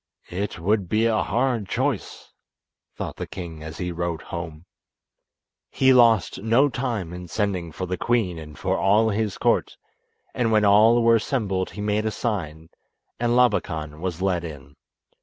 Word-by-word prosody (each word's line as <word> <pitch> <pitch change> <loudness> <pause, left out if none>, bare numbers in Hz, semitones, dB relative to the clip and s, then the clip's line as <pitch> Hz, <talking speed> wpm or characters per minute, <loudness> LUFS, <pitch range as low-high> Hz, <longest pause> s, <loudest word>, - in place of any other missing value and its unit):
"It 100 +4 -3
would 95 +1 0
be 110 +1 +2
a 110 -2 +2
hard 120 -2 0
choice," 130 -3 -3 0.6
thought - - -6
the - - -5
king 85 -4 -8
as 80 0 -8
he 90 0 -3
rode 85 -1 -3
home. 85 -1 -7 1.0
He 130 0 +4
lost 115 -6 +4
no 115 +7 +3
time 115 -9 -3
in 90 0 -8
sending 90 -2 -2
for 95 - -5
the 90 0 -4
queen 110 -8 0
and 75 -1 -11
for 95 0 -1
all 105 +3 +3
his 105 -2 -1
court, - - +1 0.6
and 115 -2 0
when 105 -1 +4
all 110 +4 +5
were 115 0 +5
assembled 100 -6 -1
he 105 - -8
made 105 +1 0
a - - +2
sign, 85 -8 -4 0.5
and 120 0 +1
Labakan 80 -11 +1
was 90 -1 -3
led 90 -3 0
in. 70 -4 -9
100 Hz, 160 wpm, -24 LUFS, 85-115 Hz, 1.0 s, all